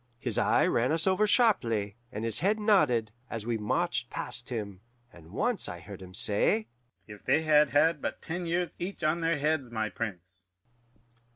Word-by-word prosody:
His -, -, +1 dB
eye -, -, +3 dB
ran 120 Hz, +4 st, +1 dB
us 160 Hz, 0 st, 0 dB
over 190 Hz, +3 st, +3 dB
sharply, 115 Hz, -, +2 dB, 0.2 s
and 110 Hz, 0 st, -4 dB
his 115 Hz, -2 st, 0 dB
head 205 Hz, +4 st, +1 dB
nodded, 150 Hz, -, +3 dB, 0.2 s
as 115 Hz, -2 st, -5 dB
we 120 Hz, 0 st, -1 dB
marched 105 Hz, -, -1 dB
past 125 Hz, 0 st, -4 dB
him; 100 Hz, -6 st, -5 dB, 0.3 s
and 80 Hz, -2 st, -15 dB
once 225 Hz, -, -1 dB
I 85 Hz, -, -7 dB
heard 95 Hz, +2 st, -10 dB
him 90 Hz, 0 st, -10 dB
say, 105 Hz, +2 st, +2 dB, 0.4 s
'If 105 Hz, -1 st, -12 dB
they 145 Hz, +5 st, +2 dB
had 150 Hz, -2 st, +4 dB
had 150 Hz, +3 st, +3 dB
but -, -, -3 dB
ten 175 Hz, +1 st, -5 dB
years 175 Hz, +1 st, -1 dB
each 180 Hz, 0 st, -5 dB
on 155 Hz, +2 st, +1 dB
their 165 Hz, -1 st, +1 dB
heads, 150 Hz, -3 st, 0 dB
my 110 Hz, -2 st, -2 dB
Prince! 95 Hz, -4 st, -7 dB
125 Hz, 180 wpm, -29 LUFS, 105-165 Hz, 0.4 s, had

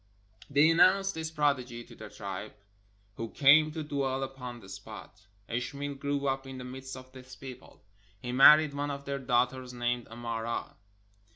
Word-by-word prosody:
They 145 Hz, +3 st, +5 dB
announced 195 Hz, +3 st, +4 dB
this 160 Hz, 0 st, -4 dB
prodigy 130 Hz, -6 st, 0 dB
to -, -, -15 dB
their -, -, -10 dB
tribe, -, -, -7 dB, 0.6 s
who 115 Hz, 0 st, -4 dB
came 150 Hz, +4 st, +6 dB
to 160 Hz, -1 st, -4 dB
dwell 135 Hz, -2 st, -1 dB
upon 125 Hz, -2 st, -7 dB
the 95 Hz, -, -14 dB
spot. 100 Hz, 0 st, -11 dB, 0.2 s
Ishmael 140 Hz, +4 st, -3 dB
grew 140 Hz, 0 st, -2 dB
up 135 Hz, 0 st, -1 dB
in 135 Hz, -1 st, -7 dB
the 125 Hz, -, -7 dB
midst 130 Hz, +1 st, -8 dB
of 130 Hz, 0 st, -12 dB
this 130 Hz, -1 st, -12 dB
people; 130 Hz, -5 st, -12 dB, 0.4 s
he 120 Hz, +4 st, -5 dB
married 150 Hz, +3 st, +7 dB
one 145 Hz, +1 st, -2 dB
of 140 Hz, 0 st, -5 dB
their 140 Hz, 0 st, -3 dB
daughters, 125 Hz, 0 st, 0 dB
named 120 Hz, 0 st, -1 dB
Amara. 115 Hz, 0 st, -4 dB
130 Hz, 165 wpm, -30 LUFS, 120-145 Hz, 0.6 s, married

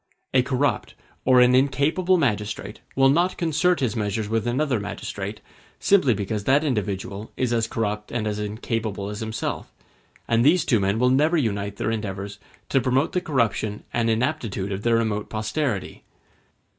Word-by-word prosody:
A 130 Hz, -, +5 dB
corrupt 130 Hz, +2 st, -1 dB, 0.3 s
or 130 Hz, -1 st, +6 dB
an 125 Hz, 0 st, +5 dB
incapable 145 Hz, +8 st, +3 dB
magistrate 105 Hz, -7 st, -2 dB, 0.2 s
will 135 Hz, 0 st, +5 dB
not 175 Hz, +5 st, +2 dB
concert 170 Hz, 0 st, +1 dB
his 125 Hz, -3 st, 0 dB
measures 105 Hz, -1 st, -1 dB
with 115 Hz, +1 st, -1 dB
another 130 Hz, 0 st, +1 dB
magistrate, 100 Hz, -, -5 dB, 0.4 s
simply 180 Hz, -, +4 dB
because 100 Hz, +1 st, -3 dB
that 140 Hz, +3 st, +4 dB
individual 105 Hz, -5 st, -3 dB
is 125 Hz, -2 st, 0 dB
as 115 Hz, -1 st, +1 dB
corrupt 105 Hz, -2 st, -3 dB
and 115 Hz, -3 st, -2 dB
as 105 Hz, -1 st, -2 dB
incapable 105 Hz, -1 st, -3 dB
as 105 Hz, 0 st, -6 dB
himself; 110 Hz, 0 st, -4 dB, 0.6 s
and 115 Hz, 0 st, +3 dB
these 165 Hz, +4 st, +4 dB
two 115 Hz, -6 st, +3 dB
men 100 Hz, +2 st, +1 dB
will 125 Hz, +2 st, +3 dB
never 155 Hz, +6 st, +3 dB
unite 100 Hz, -7 st, -1 dB
their 110 Hz, -, -1 dB
endeavors 100 Hz, -2 st, -4 dB, 0.3 s
to 135 Hz, -, +3 dB
promote 130 Hz, +5 st, +1 dB
the 180 Hz, -, 0 dB
corruption 110 Hz, -, -1 dB
and 115 Hz, -1 st, +1 dB
inaptitude 115 Hz, -5 st, -1 dB
of 95 Hz, +1 st, -3 dB
their 115 Hz, +1 st, +2 dB
remote 110 Hz, -2 st, -1 dB
posterity. 110 Hz, 0 st, -2 dB
115 Hz, 160 wpm, -24 LUFS, 105-135 Hz, 0.6 s, or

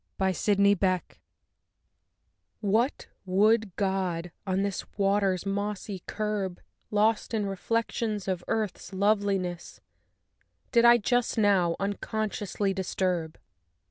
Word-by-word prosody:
GENIUS 190 Hz, 0 st, 0 dB
LOCI 200 Hz, -1 st, +4 dB
I 185 Hz, -2 st, +3 dB, 1.6 s
What 225 Hz, +6 st, +1 dB, 0.2 s
wood 205 Hz, +1 st, +2 dB
god, 185 Hz, -3 st, -1 dB, 0.2 s
on 190 Hz, +1 st, +1 dB
this 200 Hz, -2 st, -2 dB
water's 195 Hz, -2 st, +1 dB
mossy 200 Hz, -1 st, -3 dB
curb, 210 Hz, -4 st, -2 dB, 0.3 s
Lost 215 Hz, +2 st, +1 dB
in 210 Hz, -2 st, 0 dB
reflections 215 Hz, +1 st, -2 dB
of 185 Hz, -2 st, -2 dB
Earth's 215 Hz, -3 st, -2 dB
loveliness, 195 Hz, -3 st, 0 dB, 0.9 s
Did 235 Hz, -1 st, +5 dB
I, 240 Hz, 0 st, +8 dB
just 245 Hz, +2 st, 0 dB
now, 190 Hz, -5 st, +3 dB
unconsciously 205 Hz, 0 st, -2 dB
disturb? 180 Hz, -3 st, -2 dB
200 Hz, 100 wpm, -28 LUFS, 185-215 Hz, 1.6 s, I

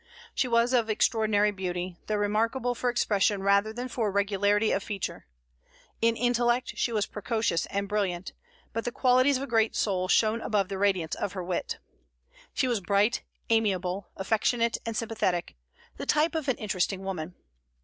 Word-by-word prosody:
She 255 Hz, -, +1 dB
was 235 Hz, +1 st, +2 dB
of 235 Hz, -3 st, +2 dB
extraordinary 215 Hz, -1 st, +2 dB
beauty, 180 Hz, -2 st, -4 dB
though 215 Hz, -, 0 dB
remarkable 225 Hz, +5 st, 0 dB
for 245 Hz, +1 st, -1 dB
expression 205 Hz, -4 st, +1 dB
rather 200 Hz, +2 st, +3 dB
than 245 Hz, +3 st, -5 dB
for 230 Hz, -4 st, -1 dB
regularity 205 Hz, +1 st, +2 dB
of 195 Hz, -, +1 dB
feature. 200 Hz, -2 st, -5 dB, 0.7 s
In 230 Hz, 0 st, +3 dB
intellect 245 Hz, +1 st, +1 dB
she 240 Hz, -, 0 dB
was 215 Hz, -2 st, +1 dB
precocious 215 Hz, -5 st, -1 dB
and 200 Hz, 0 st, -2 dB
brilliant; 195 Hz, -3 st, -2 dB, 0.4 s
but 230 Hz, -, -2 dB
the 245 Hz, -, -2 dB
qualities 255 Hz, +2 st, +3 dB
of 265 Hz, -, -4 dB
a -, -, -4 dB
great 225 Hz, -2 st, +2 dB
soul 185 Hz, -3 st, 0 dB
shone 220 Hz, +3 st, +3 dB
above 205 Hz, -4 st, 0 dB
the 195 Hz, -1 st, -4 dB
radiance 190 Hz, -5 st, +1 dB
of 190 Hz, -, -3 dB
her 185 Hz, -2 st, -4 dB
wit. 175 Hz, 0 st, -3 dB, 0.7 s
She 260 Hz, -, 0 dB
was 240 Hz, -4 st, +1 dB
bright, 200 Hz, +5 st, +2 dB, 0.3 s
amiable, 195 Hz, -4 st, 0 dB
affectionate, 225 Hz, +3 st, +1 dB
and 225 Hz, -1 st, -2 dB
sympathetic, 215 Hz, -6 st, -1 dB, 0.4 s
the -, -, -6 dB
type 305 Hz, +3 st, +3 dB
of 315 Hz, -3 st, -2 dB
an 265 Hz, -, +1 dB
interesting 195 Hz, -2 st, -1 dB
woman. 180 Hz, -3 st, -5 dB
210 Hz, 165 wpm, -28 LUFS, 195-235 Hz, 0.7 s, rather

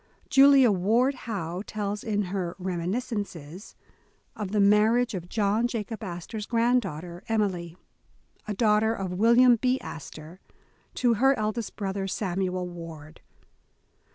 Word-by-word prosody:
Julia 270 Hz, -3 st, +7 dB
Ward 225 Hz, +8 st, +2 dB
Howe 190 Hz, -8 st, -5 dB
tells 210 Hz, -1 st, -4 dB
in 210 Hz, -2 st, 0 dB
her 180 Hz, -2 st, -3 dB
"Reminiscences", 185 Hz, -, -4 dB, 0.6 s
of 210 Hz, -3 st, -4 dB
the 210 Hz, -, +1 dB
marriage 215 Hz, +4 st, +4 dB
of 175 Hz, -2 st, -6 dB
John 215 Hz, +2 st, +1 dB
Jacob 225 Hz, -2 st, -5 dB
Astor 180 Hz, +3 st, -6 dB
's 210 Hz, -, -6 dB
granddaughter, 195 Hz, -8 st, -1 dB
Em 220 Hz, -1 st, +2 dB
ily, 175 Hz, -3 st, -4 dB, 0.7 s
a 210 Hz, -, -3 dB
daughter 220 Hz, 0 st, +2 dB
of 190 Hz, -3 st, -4 dB
William 235 Hz, +5 st, +5 dB
B. 255 Hz, +3 st, +1 dB
Astor, 160 Hz, +2 st, -10 dB, 0.6 s
to 245 Hz, -2 st, +2 dB
her 270 Hz, +4 st, +3 dB
eldest 215 Hz, +1 st, -3 dB
broth 195 Hz, -2 st, -3 dB
er, 195 Hz, 0 st, -2 dB
Samuel 185 Hz, -2 st, -2 dB
Ward. 165 Hz, -3 st, -10 dB
205 Hz, 130 wpm, -26 LUFS, 180-230 Hz, 0.7 s, Julia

